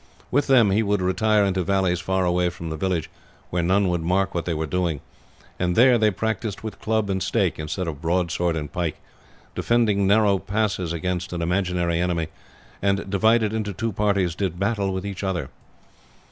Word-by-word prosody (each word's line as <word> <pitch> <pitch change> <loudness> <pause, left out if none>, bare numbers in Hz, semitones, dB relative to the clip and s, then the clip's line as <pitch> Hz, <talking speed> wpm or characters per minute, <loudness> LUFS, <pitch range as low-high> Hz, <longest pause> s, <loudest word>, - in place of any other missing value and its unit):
With 145 +2 +2
them 120 -7 +5
he 105 +3 +3
would 105 -2 +1
retire 100 +3 +2
into 95 -1 0
valleys 95 -1 +1
far 95 +1 0
away 90 0 +2
from 85 -2 -7
the - - -3
village, 90 0 -1 0.4
where 90 - 0
none 95 +3 +2
would 90 -1 0
mark 95 +3 0
what 85 - -2
they 85 - -1
were 80 +1 -1
doing, 85 -2 -1 0.6
and 90 -1 0
there 125 0 +6
they 110 -1 +4
practised 110 0 -3
with 110 -1 -7
club 110 -1 0
and 95 -1 -1
stake - - 0
instead 80 +4 -3
of 75 -2 -5
broadsword 85 0 0
and 75 -2 -5
pike, 85 -3 -2 0.5
defended 115 -4 +2
narrow 100 0 +3
passes 100 -5 -1
against 90 +2 -3
an 85 -1 -2
imaginary 90 -1 0
enemy, 85 -3 -1 0.5
and, 100 0 0
divided 110 +2 +3
into 105 -2 -2
two 115 +5 -2
parties, 100 -3 +1
did 90 -1 -3
battle 100 -1 0
with 95 +1 -4
each 100 -1 -5
other. 90 -8 -2
95 Hz, 185 wpm, -23 LUFS, 85-105 Hz, 0.6 s, there